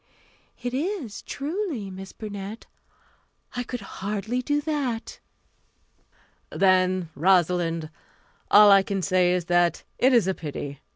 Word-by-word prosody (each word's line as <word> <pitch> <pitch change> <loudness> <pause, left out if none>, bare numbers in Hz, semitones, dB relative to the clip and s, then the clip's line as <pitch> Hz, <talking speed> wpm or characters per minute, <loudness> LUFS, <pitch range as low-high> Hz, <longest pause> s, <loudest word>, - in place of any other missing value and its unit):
"It 245 0 -3
is, 285 - -3
truly, 290 - -4
Miss 190 +1 -9
Burnett. 205 0 -7 0.9
I 245 - -1
could 245 -1 -5 0.2
hardly 210 +5 -2
do 290 +3 0
that." 280 -7 -3 1.3
"Then, 185 -2 +2
Rosalind, 170 -1 +2 0.6
all 205 0 +8
I 195 0 +7
can 195 -1 -3
say 185 -1 +3
is 180 -2 0
that 175 0 +2 0.2
it 260 - +5
is 235 -6 +4
a 190 - +1
pity. 145 -4 -6
195 Hz, 120 wpm, -25 LUFS, 180-245 Hz, 1.3 s, all